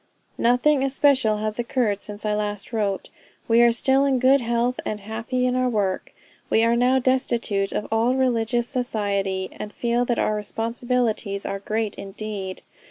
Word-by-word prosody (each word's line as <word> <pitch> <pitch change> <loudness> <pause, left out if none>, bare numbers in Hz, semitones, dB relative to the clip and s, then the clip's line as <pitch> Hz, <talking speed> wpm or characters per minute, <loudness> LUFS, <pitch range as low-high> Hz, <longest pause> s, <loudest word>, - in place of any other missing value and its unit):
"Nothing 250 +4 +3
especial 265 -5 +3
has 215 +1 -3
occurred 235 -4 0
since 210 +1 -8
I 210 - +1
last 210 +1 -3
wrote. 205 -3 -2 0.4
We 230 +1 +5
are 240 0 +6
still 265 +3 +3
in 275 -2 +2
good 260 +2 +4
health, 235 +1 0
and 210 -1 -4
happy 230 +4 -2
in 250 0 +1
our 255 0 +1
work. 200 -5 -1 0.4
We 225 - +3
are 230 +1 +3
now 250 +2 +3
destitute 240 -6 0
of 210 - -3
all 230 +3 +2
religious 240 -2 +1
society, 200 -7 -1
and 210 - -7
feel 235 +2 0
that 240 -1 0
our 215 - +1
responsibilities 225 -1 -2
are 195 - -3
great 215 +1 -2
indeed.... 195 -1 -6
230 Hz, 165 wpm, -23 LUFS, 210-250 Hz, 0.4 s, are